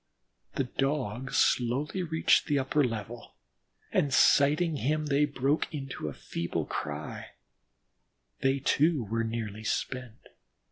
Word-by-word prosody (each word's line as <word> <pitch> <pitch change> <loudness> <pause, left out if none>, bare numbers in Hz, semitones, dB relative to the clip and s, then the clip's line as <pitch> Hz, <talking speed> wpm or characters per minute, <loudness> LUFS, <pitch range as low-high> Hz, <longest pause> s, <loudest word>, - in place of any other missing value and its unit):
The - - +1
Dogs 130 -2 -2
slowly 135 +9 +1
reached 160 -2 +3
the 145 - +2
upper 140 +2 +2
level, 115 -1 -5 0.6
and 140 - +1
sighting 150 +5 +4
him 155 +3 0
they 145 0 +3
broke 140 +1 0
into 135 - -5
a - - -3
feeble 85 0 -3
cry; 75 +1 -5 1.1
they, 135 0 +2
too, 145 +1 +2
were 115 +2 -1
nearly 110 -2 -4
spent. 125 0 -4
135 Hz, 120 wpm, -29 LUFS, 115-150 Hz, 1.1 s, sighting